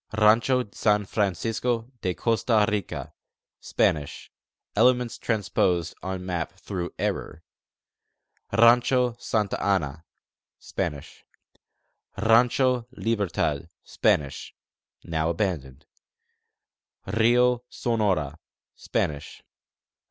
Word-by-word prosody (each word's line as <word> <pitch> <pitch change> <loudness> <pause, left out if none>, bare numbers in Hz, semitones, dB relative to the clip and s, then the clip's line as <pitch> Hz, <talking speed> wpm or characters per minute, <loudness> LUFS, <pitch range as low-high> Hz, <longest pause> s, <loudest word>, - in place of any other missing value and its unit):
Rancho 115 +4 +4
San 105 -1 +1
Francisco 115 +5 -1
de 90 -1 -1
Costa 115 -2 +2
Rica: 105 -4 -3 0.5
Spanish 75 -2 -1 0.4
(elements 125 -1 +3
transposed 95 -6 0
on 95 0 -5
map 90 -2 -3
through 95 -2 -5
error). - - -3 1.1
Rancho 120 +1 +4
Santa 105 -3 -1
Ana: 80 -6 0 0.5
Spanish. 75 0 -5 0.9
Rancho 120 +3 +3
Libertad: 95 - -1
Spanish 70 -2 0 0.5
(now 80 -1 -1
abandoned). 80 -7 -3 1.2
Rio 120 +4 +3
Sonora: 95 - -1 0.4
Spanish. 75 -2 -3
105 Hz, 75 wpm, -25 LUFS, 85-115 Hz, 1.2 s, Rancho